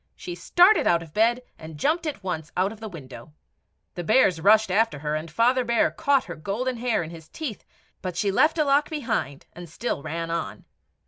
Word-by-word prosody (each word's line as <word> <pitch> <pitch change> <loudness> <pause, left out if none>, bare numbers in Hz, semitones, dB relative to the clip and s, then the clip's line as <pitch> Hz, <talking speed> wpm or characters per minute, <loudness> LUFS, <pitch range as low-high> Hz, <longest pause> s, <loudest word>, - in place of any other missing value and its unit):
She 175 - -7
started 350 - +4
out 170 -1 +3
of 160 -2 -15
bed, 235 +4 +2 0.2
and 160 -1 -10
jumped 320 - 0
at 280 -9 -5
once 160 -4 -4
out 190 +2 +1
of 220 - -11
the 220 -1 -7
window. 135 -5 -11 0.6
The 175 - -5
bears 185 -4 +3
rushed 215 +1 +4
after 220 -3 +2
her, 150 +1 -3
and 155 +2 -3
Father 245 +9 +2
Bear 240 +7 +2
caught 280 -4 +1
her 175 - -8
golden 230 +10 -3
hair 230 -5 0
in 160 - -8
his 160 -2 -12
teeth, 275 -10 -6 0.4
but 180 -2 -5
she 200 +2 +1
left 310 +11 +3
a 310 - +3
lock 285 +1 +2
behind, 230 - -3
and 175 -1 -10
still 195 0 -3
ran 165 +3 -4
on. 170 0 -4
200 Hz, 205 wpm, -25 LUFS, 165-250 Hz, 0.6 s, started